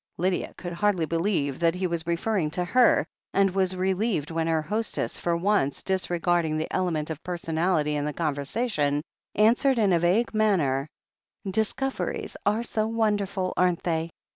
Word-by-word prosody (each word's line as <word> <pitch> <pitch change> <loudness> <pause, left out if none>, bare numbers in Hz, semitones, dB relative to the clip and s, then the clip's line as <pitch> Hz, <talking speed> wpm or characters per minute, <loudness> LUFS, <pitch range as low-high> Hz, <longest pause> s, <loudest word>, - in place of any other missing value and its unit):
Lydia 180 +1 -1
could 175 -1 -6
hardly 185 -2 +1
believe 165 -5 -1
that 170 0 +2
he 185 +1 -2
was 170 -2 -2
referring 170 0 0
to 180 +3 -2
her, 245 +6 +4 0.3
and 195 -1 +4
was 190 -1 +1
relieved 185 -3 0
when 165 0 -1
her 160 -1 +1
hostess, 215 +6 -2
for 170 -1 0
once 170 -7 +1
dis 190 -1 -1
regarding 170 -2 +1
the 155 - -2
element 165 -4 -1
of 155 0 -6
personality 165 -3 0
in 145 - -1
the 150 - -1
conversa 150 - -2
tion, 145 -8 0 0.3
answered 240 +5 +4
in 205 -5 +3
a 170 - +4
vague 190 +9 +2
manner: 160 -11 +2 0.6
"Discoveries 220 +7 -1
are 215 +3 +2
so 220 -2 -1
wonderful, 205 -4 0
aren't 180 -1 +1
they? 165 -1 -1
180 Hz, 165 wpm, -26 LUFS, 160-205 Hz, 0.6 s, her